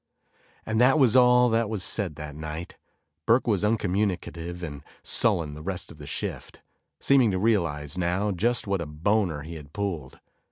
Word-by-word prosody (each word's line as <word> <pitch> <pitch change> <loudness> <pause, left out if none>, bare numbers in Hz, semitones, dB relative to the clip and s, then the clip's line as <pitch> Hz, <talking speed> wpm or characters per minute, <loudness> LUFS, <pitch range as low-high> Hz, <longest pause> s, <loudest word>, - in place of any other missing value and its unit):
And 110 +1 0
that 135 +4 +5
was 130 -6 +4
all 125 -1 +6
that 115 -1 +1
was 105 -5 -2
said 95 -5 0
that 75 0 -7
night. 80 +2 -6 0.5
Burke 120 +3 +4
was 105 -4 +1
uncommunicative 90 -5 -1
and 75 -4 -6 0.2
sullen 80 -4 +2
the 75 - -9
rest 90 +2 -5
of 75 - -14
the 75 - -9
shift, - - -6 0.4
seeming 135 -4 +4
to 95 - 0
realize 85 -7 0
now 90 +4 0
just 115 +7 0
what 100 -3 -1
a 85 - -4
boner 80 0 0
he 80 +2 -8
had 75 -2 -13
pulled. 90 -10 -4
95 Hz, 170 wpm, -26 LUFS, 80-110 Hz, 0.5 s, all